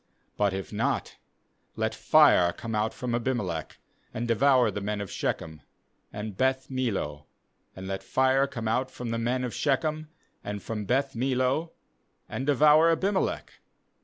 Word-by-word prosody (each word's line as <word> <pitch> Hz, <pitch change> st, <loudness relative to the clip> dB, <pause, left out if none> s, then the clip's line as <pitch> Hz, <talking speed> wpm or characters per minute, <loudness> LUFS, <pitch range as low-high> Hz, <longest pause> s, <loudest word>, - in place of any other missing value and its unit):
20But 100 Hz, -2 st, +2 dB
if 95 Hz, -3 st, -5 dB
not, -, -, -1 dB, 0.6 s
let -, -, -1 dB
fire 85 Hz, -1 st, +5 dB
come 115 Hz, -1 st, -6 dB
out 110 Hz, +1 st, 0 dB
from 125 Hz, -2 st, -4 dB
Abimelech, 115 Hz, -, -2 dB, 0.4 s
and 120 Hz, +1 st, -2 dB
devour 125 Hz, 0 st, +4 dB
the 100 Hz, -, -5 dB
men 105 Hz, +1 st, -2 dB
of 100 Hz, -2 st, -5 dB
Shechem, 80 Hz, -1 st, -3 dB, 0.5 s
and 105 Hz, -1 st, -6 dB
Beth 130 Hz, +3 st, 0 dB
mill 130 Hz, -6 st, 0 dB
o; 75 Hz, 0 st, -5 dB, 0.5 s
and 95 Hz, 0 st, -8 dB
let 95 Hz, 0 st, -3 dB
fire 130 Hz, +1 st, +2 dB
come 115 Hz, -4 st, -5 dB
out 125 Hz, +4 st, 0 dB
from 120 Hz, -2 st, -6 dB
the 115 Hz, -, -1 dB
men 125 Hz, +2 st, 0 dB
of 125 Hz, -, -2 dB
Skechem, 155 Hz, +2 st, 0 dB, 0.4 s
and 105 Hz, 0 st, -5 dB
from 105 Hz, -2 st, -4 dB
Beth 135 Hz, +4 st, 0 dB
millo, 130 Hz, +6 st, 0 dB, 0.5 s
and 130 Hz, -, -4 dB
devour 150 Hz, +3 st, +6 dB
Abimelech.' 190 Hz, +4 st, -1 dB
120 Hz, 155 wpm, -27 LUFS, 105-135 Hz, 0.6 s, devour